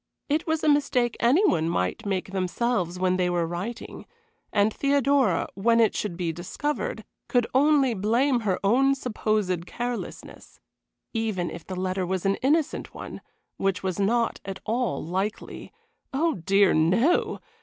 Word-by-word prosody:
It 305 Hz, +4 st, 0 dB
was 320 Hz, 0 st, 0 dB
a -, -, +2 dB
mistake 280 Hz, -5 st, +2 dB
any 275 Hz, -, +4 dB
one 165 Hz, -, +1 dB
might 90 Hz, -, -2 dB
make 190 Hz, -1 st, -2 dB
themselves 185 Hz, -1 st, -1 dB
when 185 Hz, 0 st, +1 dB
they 180 Hz, -1 st, +1 dB
were 175 Hz, -1 st, 0 dB
writing, 180 Hz, +8 st, -6 dB, 0.4 s
and 205 Hz, +1 st, +2 dB
Theodora, 275 Hz, -7 st, +2 dB
when 230 Hz, +4 st, +2 dB
it 225 Hz, -2 st, +3 dB
should 185 Hz, -5 st, -3 dB
be 170 Hz, -3 st, -2 dB
discovered, 295 Hz, -, -3 dB, 0.2 s
could 245 Hz, -3 st, +2 dB
only 275 Hz, -2 st, +4 dB
blame 235 Hz, +6 st, +2 dB
her 200 Hz, -5 st, -1 dB
own 270 Hz, +7 st, +4 dB
supposed 215 Hz, -8 st, -1 dB
carelessness. 245 Hz, 0 st, -6 dB, 0.5 s
Even 215 Hz, -6 st, -1 dB
if 165 Hz, -, -9 dB
the 185 Hz, -, -5 dB
letter 185 Hz, 0 st, -1 dB
was 190 Hz, 0 st, -2 dB
an 195 Hz, 0 st, +2 dB
innocent 300 Hz, +3 st, 0 dB
one, -, -, -8 dB, 0.4 s
which 195 Hz, -1 st, -1 dB
was 190 Hz, 0 st, -2 dB
not 230 Hz, +4 st, +1 dB
at 195 Hz, 0 st, -6 dB
all 230 Hz, -, -1 dB
likely. 190 Hz, +5 st, -4 dB, 0.4 s
Oh, 320 Hz, +5 st, +1 dB
dear, 195 Hz, +3 st, +3 dB
no! 190 Hz, -, +2 dB
215 Hz, 150 wpm, -26 LUFS, 185-255 Hz, 0.5 s, any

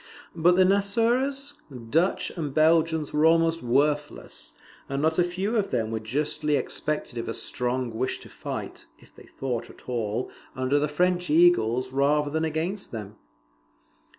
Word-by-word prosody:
But 175 Hz, +2 st, +4 dB
the 185 Hz, -, +6 dB
Nassauers, 235 Hz, +8 st, +1 dB, 0.4 s
Dutch, 170 Hz, +5 st, +2 dB
and 150 Hz, -6 st, -5 dB
Belgians 160 Hz, 0 st, +3 dB
were 150 Hz, +1 st, +2 dB
almost 165 Hz, 0 st, +3 dB
worthless; 145 Hz, +4 st, -1 dB, 0.4 s
and 135 Hz, 0 st, -2 dB
not 160 Hz, +3 st, +1 dB
a -, -, +6 dB
few 185 Hz, +6 st, -2 dB
of 205 Hz, -3 st, +1 dB
them 115 Hz, -3 st, -1 dB
were 110 Hz, -, -1 dB
justly 145 Hz, +6 st, 0 dB
suspected 150 Hz, -5 st, -3 dB
of 115 Hz, -, -4 dB
a 115 Hz, -, -3 dB
strong 125 Hz, -1 st, -2 dB
wish 130 Hz, -, -1 dB
to -, -, -12 dB
fight, -, -, -7 dB
if -, -, -22 dB
they -, -, -15 dB
fought 125 Hz, -3 st, -4 dB
at -, -, -16 dB
all, 115 Hz, -1 st, -2 dB, 0.2 s
under 130 Hz, +2 st, +1 dB
the 150 Hz, -, +1 dB
French 180 Hz, +4 st, +1 dB
eagles 130 Hz, -7 st, +4 dB
rather 145 Hz, +2 st, +2 dB
than 160 Hz, +1 st, 0 dB
against 165 Hz, +6 st, -3 dB
them. 105 Hz, -2 st, -7 dB
150 Hz, 155 wpm, -26 LUFS, 130-175 Hz, 0.4 s, the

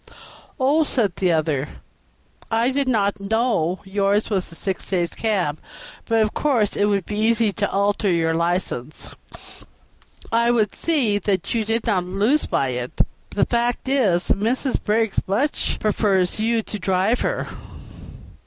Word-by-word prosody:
"Oh!" 285 Hz, +5 st, +3 dB
said 225 Hz, -, 0 dB
the 185 Hz, -2 st, +2 dB
other, 150 Hz, -3 st, 0 dB, 0.8 s
"I 230 Hz, +3 st, +2 dB
did 275 Hz, 0 st, 0 dB
not 205 Hz, -4 st, +1 dB
know 200 Hz, -4 st, 0 dB
yours 200 Hz, +2 st, 0 dB
was 190 Hz, -4 st, -1 dB
a -, -, -8 dB
six 190 Hz, +2 st, -3 dB
days' 175 Hz, -3 st, 0 dB
cab; 185 Hz, -9 st, -1 dB, 0.5 s
but 225 Hz, -1 st, +2 dB
of 215 Hz, -, -2 dB
course 245 Hz, -9 st, +1 dB
it 205 Hz, -, +2 dB
would 200 Hz, -3 st, 0 dB
be 210 Hz, -, -5 dB
very 215 Hz, +1 st, +2 dB
easy 230 Hz, -2 st, +2 dB
to 205 Hz, 0 st, -1 dB
alter 200 Hz, +1 st, +1 dB
your 165 Hz, -2 st, +1 dB
license. 170 Hz, -5 st, -2 dB, 1.2 s
I 235 Hz, +1 st, +3 dB
would 220 Hz, -4 st, +2 dB
see 255 Hz, -11 st, +1 dB
that 190 Hz, -2 st, -1 dB
you 230 Hz, -2 st, +1 dB
did 225 Hz, +1 st, -1 dB
not 195 Hz, -5 st, +1 dB
lose 205 Hz, +11 st, +1 dB
by 135 Hz, -, 0 dB
it; 125 Hz, 0 st, -2 dB, 0.3 s
the 205 Hz, -, +1 dB
fact 240 Hz, +1 st, -1 dB
is, 215 Hz, -11 st, +2 dB
Mrs. 250 Hz, +6 st, 0 dB
Briggs 220 Hz, 0 st, +1 dB
very 200 Hz, +5 st, +1 dB
much 295 Hz, -, -2 dB
prefers 200 Hz, -3 st, +1 dB
you 225 Hz, +1 st, +1 dB
to 210 Hz, -, -6 dB
drive 190 Hz, +5 st, +1 dB
her." -, -, -2 dB
205 Hz, 155 wpm, -22 LUFS, 185-230 Hz, 1.2 s, Oh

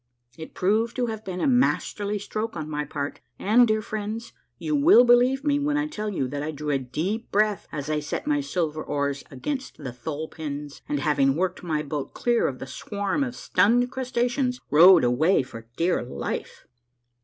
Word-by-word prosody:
It 160 Hz, +2 st, -10 dB
proved 220 Hz, +5 st, +1 dB
to 250 Hz, -, 0 dB
have 220 Hz, -2 st, -5 dB
been 185 Hz, -3 st, -5 dB
a -, -, +1 dB
masterly 220 Hz, -5 st, +1 dB
stroke 215 Hz, 0 st, -4 dB
on 155 Hz, -1 st, -4 dB
my 150 Hz, -1 st, -3 dB
part, 145 Hz, 0 st, -4 dB, 0.2 s
and, 235 Hz, +4 st, +4 dB
dear 215 Hz, 0 st, +1 dB
friends, 215 Hz, +2 st, -5 dB, 0.2 s
you 310 Hz, -1 st, -1 dB
will 285 Hz, -3 st, +7 dB
believe 250 Hz, +3 st, +4 dB
me 290 Hz, -1 st, +2 dB
when 295 Hz, +1 st, 0 dB
I 300 Hz, -, +1 dB
tell 215 Hz, -9 st, -4 dB
you 155 Hz, -10 st, -1 dB
that 145 Hz, +1 st, -4 dB
I 150 Hz, -, -3 dB
drew 150 Hz, -1 st, -3 dB
a 135 Hz, -, +1 dB
deep 165 Hz, -, -3 dB
breath 210 Hz, -1 st, +1 dB
as 145 Hz, -2 st, -5 dB
I 155 Hz, 0 st, 0 dB
set 150 Hz, -, -4 dB
my 295 Hz, -1 st, +1 dB
silver 160 Hz, -, -2 dB
oars 140 Hz, -1 st, -2 dB
against 265 Hz, -, -5 dB
the 130 Hz, -5 st, -7 dB
thole 150 Hz, +5 st, -5 dB
pins, 145 Hz, -3 st, -7 dB
and, 145 Hz, -1 st, -1 dB
having 135 Hz, -1 st, +2 dB
worked 185 Hz, +2 st, -1 dB
my 155 Hz, -3 st, -1 dB
boat 145 Hz, -1 st, -5 dB
clear 240 Hz, -1 st, +2 dB
of 130 Hz, -, -4 dB
the -, -, -7 dB
swarms 205 Hz, -, -2 dB
of 245 Hz, -, -7 dB
stunned 240 Hz, +7 st, +2 dB
crustaceans, 250 Hz, 0 st, -1 dB
rowed 175 Hz, +2 st, +8 dB
away 135 Hz, +7 st, +3 dB
for 115 Hz, -3 st, -11 dB
dear 175 Hz, +2 st, +1 dB
life 120 Hz, -, -5 dB
190 Hz, 190 wpm, -25 LUFS, 150-240 Hz, 0.2 s, rowed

